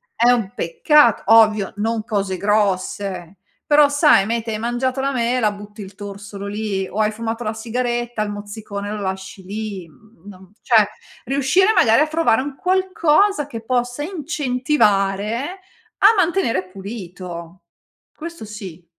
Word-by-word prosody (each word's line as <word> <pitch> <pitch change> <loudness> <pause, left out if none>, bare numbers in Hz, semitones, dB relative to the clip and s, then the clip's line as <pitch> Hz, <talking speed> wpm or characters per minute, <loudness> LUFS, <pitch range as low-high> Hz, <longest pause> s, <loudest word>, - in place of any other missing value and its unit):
è 240 - +4
un 225 -6 0
peccat 240 - +3
ovvio, 215 -2 +5
non 220 +1 -1
cose 200 -4 -2
grosse, 195 -3 -1 0.3
però 295 -1 +5
sai 290 - +4
mete 230 +1 -2
hai 215 - -3
mangiato 245 +3 -1
la 275 +1 0
mela, 235 -2 +1
butti 205 +1 -11
il 195 -1 -10
torsolo 200 0 -8
lì, 205 -2 -2
o 215 - -6
hai 215 0 +2
fumato 230 +2 -4
la 215 - -1
sigaretta, 240 0 -2
il 210 - -4
mozzicone 205 0 -6
lo 210 -1 -4
lasci 190 0 -5
lì. 200 -2 -6
Mhmm, 205 +4 -22
non 190 -2 -13
cioè, 220 -4 +4 0.4
riuscire 280 - +3
magari 225 - +5
a 305 - +3
trovare 310 -6 +2
un 280 0 -6
qualcosa 370 -3 +2
che 230 -5 -7
possa 245 +2 -1
incentivare 260 - 0 0.4
a 400 - +7
mantenere 330 - +1
pulito. 185 -3 -8 0.5
Questo 335 -6 -8
sì. 190 -5 -9
220 Hz, 140 wpm, -20 LUFS, 200-260 Hz, 0.5 s, a